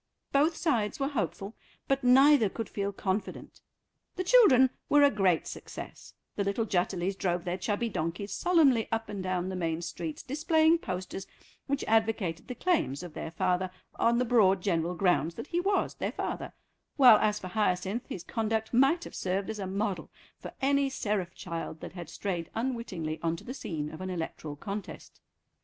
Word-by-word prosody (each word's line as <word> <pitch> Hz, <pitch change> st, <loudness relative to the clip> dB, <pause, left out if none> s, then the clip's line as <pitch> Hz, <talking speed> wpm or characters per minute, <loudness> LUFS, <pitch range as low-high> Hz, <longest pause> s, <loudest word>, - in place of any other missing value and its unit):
Both 300 Hz, +4 st, +3 dB
sides 235 Hz, -10 st, 0 dB
were 275 Hz, 0 st, 0 dB
hopeful, 220 Hz, -6 st, -3 dB, 0.3 s
but 275 Hz, 0 st, +1 dB
neither 265 Hz, -2 st, +6 dB
could 225 Hz, +2 st, -5 dB
feel 200 Hz, 0 st, -2 dB
confident. 195 Hz, +1 st, -4 dB, 0.5 s
The 370 Hz, -, -2 dB
children 310 Hz, -, +6 dB, 0.2 s
were 290 Hz, 0 st, +6 dB
a 285 Hz, -, +6 dB
great 190 Hz, -5 st, +2 dB
success; -, -, -9 dB, 0.2 s
the 200 Hz, -, 0 dB
little 200 Hz, +3 st, 0 dB
Jutterlys 185 Hz, -1 st, 0 dB
drove 175 Hz, -2 st, -1 dB
their 180 Hz, +1 st, -2 dB
chubby 210 Hz, +4 st, -1 dB
donkeys 185 Hz, +1 st, -3 dB
solemnly 300 Hz, -10 st, +3 dB
up 225 Hz, 0 st, -2 dB
and 200 Hz, -2 st, -4 dB
down 185 Hz, 0 st, -1 dB
the 190 Hz, -, -4 dB
main 165 Hz, -2 st, -2 dB
streets, 160 Hz, -2 st, -5 dB
displaying 315 Hz, +4 st, +3 dB
posters 185 Hz, -, -5 dB, 0.4 s
which 280 Hz, 0 st, -1 dB
advocated 220 Hz, -6 st, 0 dB
the 250 Hz, -, -5 dB
claims 240 Hz, -, 0 dB
of 175 Hz, -3 st, -8 dB
their -, -, -5 dB
father 185 Hz, +2 st, 0 dB, 0.2 s
on 235 Hz, +1 st, +2 dB
the 250 Hz, -, +2 dB
broad 195 Hz, -6 st, +4 dB
general 175 Hz, -2 st, 0 dB
grounds 175 Hz, -3 st, +1 dB
that -, -, -6 dB
he 340 Hz, +3 st, -1 dB
was 395 Hz, +3 st, +1 dB
their -, -, -3 dB
father, -, -, -4 dB, 0.4 s
while 255 Hz, -7 st, +8 dB
as 210 Hz, -1 st, +1 dB
for 185 Hz, -, -7 dB
Hyacinth, 195 Hz, +2 st, -1 dB
his 175 Hz, -, -5 dB
conduct 220 Hz, 0 st, -2 dB
might 270 Hz, +8 st, +4 dB
have -, -, -9 dB
served 190 Hz, +3 st, -2 dB
as 215 Hz, -, -7 dB
a 195 Hz, -, -3 dB
model 195 Hz, -3 st, -2 dB, 0.3 s
for -, -, -8 dB
any 280 Hz, 0 st, +3 dB
seraph 205 Hz, -8 st, -2 dB
child 165 Hz, -2 st, -6 dB
that -, -, -8 dB
had 175 Hz, -2 st, -8 dB
strayed 175 Hz, -5 st, -4 dB
unwittingly 220 Hz, -10 st, -3 dB
on 165 Hz, 0 st, 0 dB
to -, -, -11 dB
the 255 Hz, -, -6 dB
scene 155 Hz, -, -4 dB
of 160 Hz, -, -9 dB
an 185 Hz, -, -4 dB
electoral 160 Hz, -4 st, -5 dB
contest. 200 Hz, +7 st, -7 dB
200 Hz, 180 wpm, -29 LUFS, 180-250 Hz, 0.5 s, while